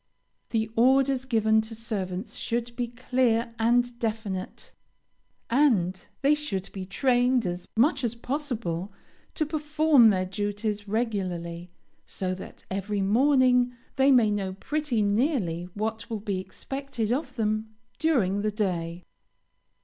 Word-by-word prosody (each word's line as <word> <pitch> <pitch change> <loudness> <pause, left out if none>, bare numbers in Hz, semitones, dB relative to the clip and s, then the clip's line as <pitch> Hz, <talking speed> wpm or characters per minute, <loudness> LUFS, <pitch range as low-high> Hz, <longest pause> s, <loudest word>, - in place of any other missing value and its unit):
The 220 -1 0
orders 265 +2 +3
given 220 -3 +3
to 220 +1 -7
servants 205 -3 -4
should 235 0 -3
be 245 -1 -1
clear 240 -1 0
and 240 +1 +2
definite; 215 -5 -4 0.8
and 215 -9 +2 0.2
they 285 +2 +5
should 255 -11 -3
be 190 -2 -6
trained 245 +2 +2
as 175 0 -4
much 275 +3 +3
as 235 -1 -1
possible 235 - -3 0.4
to 310 - +1
perform 300 -4 +4
their 185 -3 +1
duties 205 +2 -3
regularly, 185 -6 -2 0.4
so 185 -1 -2
that 185 - -10
every 200 +1 -1
morning 250 +2 +4 0.2
they 270 +1 +4
may 235 -5 +5
know 195 -2 -2
pretty 265 +2 -1
nearly 205 - +1
what 220 +1 -3
will 225 -2 -3
be 200 -2 -2
expected 235 +4 -4
of 260 0 -2
them 215 -1 -1 0.2
during 215 - +2
the 215 - +1
day. 180 -5 -2
225 Hz, 125 wpm, -27 LUFS, 195-255 Hz, 0.8 s, they